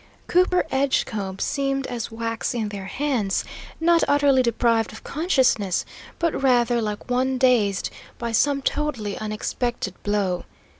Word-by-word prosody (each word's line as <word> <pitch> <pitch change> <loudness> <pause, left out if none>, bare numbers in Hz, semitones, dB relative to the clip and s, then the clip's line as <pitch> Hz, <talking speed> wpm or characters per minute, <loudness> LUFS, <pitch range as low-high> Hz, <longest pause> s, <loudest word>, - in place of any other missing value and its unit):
Cooper 360 0 +3
Edgecombe 220 -8 0
seemed 275 -1 -1
as 240 -3 -4
wax 230 +1 -3
in 220 -3 -1
their 200 -2 -6
hands, 250 -7 0 0.4
not 335 +1 +4
utterly 285 -2 +4
deprived 230 -2 +1
of 220 - -11
consciousness, 260 - +1 0.3
but 335 -4 0
rather 240 -3 +3
like 210 -1 -4
one 260 +1 +1
dazed 235 -7 +2 0.3
by 235 -1 -3
some 275 +4 +2
totally 245 -11 -1
unexpected 215 0 -3
blow. 200 -4 -1
240 Hz, 130 wpm, -23 LUFS, 210-275 Hz, 0.4 s, not